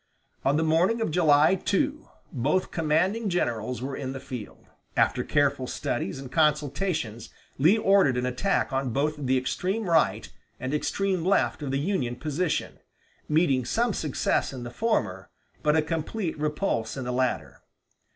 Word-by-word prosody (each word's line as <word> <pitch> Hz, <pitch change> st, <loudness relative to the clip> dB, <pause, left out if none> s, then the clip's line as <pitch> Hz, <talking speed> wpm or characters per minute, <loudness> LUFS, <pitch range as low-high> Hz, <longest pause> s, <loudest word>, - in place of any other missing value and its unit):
On 140 Hz, +2 st, +2 dB
the 160 Hz, -, +2 dB
morning 170 Hz, +8 st, +2 dB
of 225 Hz, -, -1 dB
July 155 Hz, -1 st, +5 dB
2, 285 Hz, +11 st, -1 dB, 0.2 s
both 145 Hz, +8 st, 0 dB
commanding 180 Hz, +8 st, +1 dB
generals 125 Hz, -, -1 dB
were 135 Hz, +1 st, -3 dB
in 135 Hz, -1 st, -4 dB
the 135 Hz, -, -6 dB
field. 125 Hz, -5 st, -8 dB, 0.3 s
After -, -, +2 dB
careful 140 Hz, -2 st, +1 dB
studies 120 Hz, -4 st, -3 dB
and 135 Hz, -2 st, -8 dB
consultations 150 Hz, -, 0 dB, 0.3 s
Lee 170 Hz, +10 st, +5 dB
ordered 195 Hz, -, +4 dB
an 125 Hz, -, 0 dB
attack 125 Hz, +5 st, 0 dB
on 135 Hz, -1 st, 0 dB
both 140 Hz, +6 st, 0 dB
the 130 Hz, -3 st, 0 dB
extreme 190 Hz, -, -2 dB
right 165 Hz, -2 st, +2 dB, 0.3 s
and 130 Hz, +3 st, -3 dB
extreme 185 Hz, +3 st, 0 dB
left 190 Hz, -3 st, +1 dB
of 145 Hz, -, -3 dB
the 135 Hz, -, 0 dB
Union 140 Hz, -6 st, -1 dB
position, 155 Hz, +5 st, -2 dB, 0.5 s
meeting 150 Hz, -5 st, +3 dB
some 230 Hz, -, 0 dB
success 150 Hz, -7 st, 0 dB
in 130 Hz, -3 st, -7 dB
the 120 Hz, -, -6 dB
former, 110 Hz, -, -1 dB, 0.3 s
but 150 Hz, 0 st, +2 dB
a 155 Hz, -, +3 dB
complete 165 Hz, +3 st, -3 dB
repulse 150 Hz, -, -1 dB
in 135 Hz, -, -3 dB
the 125 Hz, 0 st, -3 dB
latter. 130 Hz, 0 st, -1 dB
150 Hz, 155 wpm, -26 LUFS, 130-180 Hz, 0.5 s, July